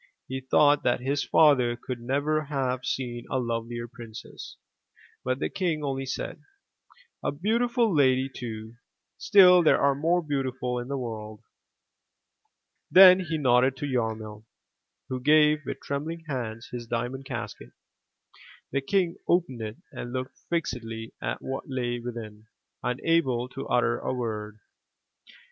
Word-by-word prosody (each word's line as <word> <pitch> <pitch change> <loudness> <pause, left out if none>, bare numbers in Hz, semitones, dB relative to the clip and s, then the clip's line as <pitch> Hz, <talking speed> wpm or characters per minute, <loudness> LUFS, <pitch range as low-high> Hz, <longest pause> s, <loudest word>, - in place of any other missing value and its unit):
He 130 +1 -4
thought 145 +2 +4
that 120 - +1
his 140 +3 0
father 130 -6 +4
could 125 0 -6
never 145 +5 0
have 130 -3 -2
seen 120 -2 -3
a 130 - 0
lovelier 120 -1 -3
princess, 115 -2 -10 0.7
but 130 0 0
the - - -1
king 170 -6 -2
only 135 -1 -2
said: 130 - -4 0.8
"A - - 0
beautiful 230 - +1
lady 130 -2 +4
too, 115 -3 -8 0.4
still 180 -4 +7
there 160 - +4
are 140 0 +4
more 165 +5 +1
beautiful 130 -4 -2
in 120 - -6
the 140 0 -2
world.*' 110 -4 -6 1.5
Then 185 0 +9
he 165 -3 -2
nodded 130 -1 +3
to 145 - -3
Yarmil, 110 -5 -3 0.6
who 130 - -3
gave 150 +2 +4
with - - -4
trembling 160 +4 -4
hands 120 -5 -4
his 120 -1 -6
diamond 125 +3 -3
casket. - - -6 1.0
The 140 - 0
King 175 +3 0
opened 165 -9 +1
it 110 0 -5
and 120 - -7
looked 130 0 -4
fixedly 115 -9 -3
at - - -3
what 135 +1 -4
lay 120 -2 -2
within, 110 -3 -8 0.3
unable 125 -1 +1
to 135 - -7
utter 120 0 +2
a - - -3
word. 110 -4 -4
130 Hz, 135 wpm, -27 LUFS, 120-150 Hz, 1.5 s, Then